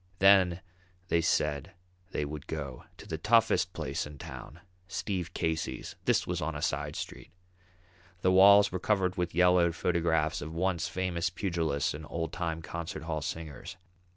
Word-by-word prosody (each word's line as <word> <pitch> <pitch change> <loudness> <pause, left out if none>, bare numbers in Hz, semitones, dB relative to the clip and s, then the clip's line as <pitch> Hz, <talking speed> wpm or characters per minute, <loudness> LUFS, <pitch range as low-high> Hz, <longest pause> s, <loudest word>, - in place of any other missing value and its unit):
Then 95 -2 +5 0.5
they 85 - +3
said 75 -4 0 0.4
they 75 - -2
would 75 0 -7
go 70 -5 -5
to - - -11
the 80 - -4
toughest 115 +5 +3
place - - -3
in 75 -1 -11
town, 80 +4 -9 0.3
"Steve 90 -1 -3
Casey's"; 80 -6 -2
this - - +3
was - - -2
on - - -2
a - - -4
side - - -1
street. - - -7 0.9
The 95 - +3
walls 100 +2 +7
were 90 - -2
covered 95 -2 +1
with 90 -3 -2
yellowed 90 -1 +4
photographs 80 -2 +1
of 80 +2 -6
once 90 -1 0
famous 90 -2 -1
pugilists 85 -7 -1
and 75 +1 -8
old 80 -1 -3
time 80 -2 -3
concert 80 -1 -5
hall 80 -2 -3
singers. 80 -2 -6
85 Hz, 155 wpm, -30 LUFS, 80-90 Hz, 0.9 s, walls